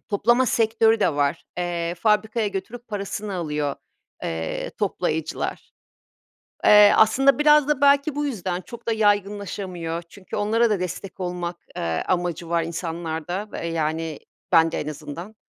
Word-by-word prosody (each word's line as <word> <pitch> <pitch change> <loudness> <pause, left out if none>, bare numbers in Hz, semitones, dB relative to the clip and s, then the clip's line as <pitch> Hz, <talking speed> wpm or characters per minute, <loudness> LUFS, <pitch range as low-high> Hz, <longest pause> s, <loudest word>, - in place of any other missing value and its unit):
toplama 240 +5 +3
sektörü 225 0 +3
de 160 - +2
var. 145 +2 0
Eee, 175 -1 -2
fabrikaya 215 +3 +1
götürüp 225 +5 -6
parasını 205 -1 -4
alıyor, 150 -4 -2 0.5
eee, 80 0 -3
toplayıcılar. 160 0 -2 0.9
Eee, 210 -1 +8
aslında 270 +5 +4
biraz 300 -1 +5
da 290 -2 0
belki 280 +1 +4
bu 295 - -1
yüzden 185 -9 -3
çok 235 +3 -12
da - - +2
yaygınlaşamıyor. 200 -5 -1
Çünkü 190 -2 -9
onlara 225 +3 +2
da 210 -4 +1
destek 180 +1 -5
olmak, 175 -1 -3 0.2
eee, 80 -1 -2
amacı 175 -2 -1
var 170 -1 +1
insanlarda, 170 +3 -4
eee, 170 - -4
yani, 160 -1 -2 0.3
bende 165 0 +4
en 150 - -4
azından. 155 +7 -7
185 Hz, 135 wpm, -23 LUFS, 165-220 Hz, 0.9 s, Eee